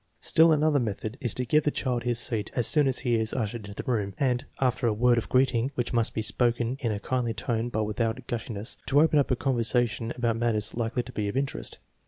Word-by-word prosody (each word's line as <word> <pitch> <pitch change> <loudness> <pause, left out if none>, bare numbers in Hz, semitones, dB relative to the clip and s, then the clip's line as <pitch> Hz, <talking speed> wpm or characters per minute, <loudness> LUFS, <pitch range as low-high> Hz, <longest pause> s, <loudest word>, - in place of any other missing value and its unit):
Still 165 +1 +4
another 150 -1 +3
method 110 -1 -3
is 120 -5 -1
to 125 - -2
give 150 +6 +3
the - - +2
child 125 -4 -1
his 120 -1 -1
seat 115 -3 -1
as 120 - +1
soon 150 +2 +4
as 130 - +1
he 120 -2 +3
is 110 0 -1
ushered 110 -3 -3
into 100 +1 -7
the - - -2
room, 100 -5 -1
and, 125 -2 +1 0.2
after 125 -1 +1
a 110 - +2
word 120 +2 +3
of - - -7
greeting, 130 -1 +2
which 120 0 -2
must 115 -2 +1
be 110 - -1
spoken 120 +1 0
in 115 -5 -1
a 105 - -2
kindly 120 0 -1
tone 115 +1 -2
but 110 -2 -1
without 115 +3 -2
gushi 115 0 -4
ness, 105 +4 -4
to 140 - +4
open 155 -1 +4
up 140 - +1
a 130 - +2
conversation 120 -2 0
about 120 -2 0
matters 110 -3 -1
likely 120 +1 -1
to - - -10
be 105 -1 -2
of 100 - -3
interest. 135 0 -3
120 Hz, 245 wpm, -27 LUFS, 110-130 Hz, 0.2 s, Still